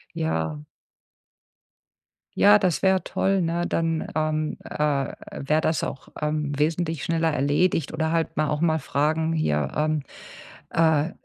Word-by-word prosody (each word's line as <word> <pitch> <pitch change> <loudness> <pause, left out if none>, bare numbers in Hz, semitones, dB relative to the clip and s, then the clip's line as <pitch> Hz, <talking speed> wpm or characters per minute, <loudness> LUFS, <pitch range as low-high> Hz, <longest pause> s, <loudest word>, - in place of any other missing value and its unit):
Ja. 80 -1 -2 1.8
Ja, 205 +1 +7
das 185 -5 0
wär 190 -1 +3
toll, 195 0 0
ne? 170 +1 0
Dann, 165 -1 -1
ähm, 155 0 -1
äh, - - -8 0.6
wär 150 +3 +1
das 160 -2 0
auch, 135 - -5
ähm, 150 -1 -1
wesentlich 160 +1 0
schneller 165 -1 +1
erledigt, 145 +3 +1
oder 160 0 -1
halt 165 -2 -1
mal 155 -1 +2
auch 150 +1 -1
mal 160 -2 +2
fragen: 155 +3 0
„Hier, 75 - 0
ähm, 155 0 +1 0.7
äh, 160 0 +2
155 Hz, 135 wpm, -24 LUFS, 150-165 Hz, 1.8 s, Ja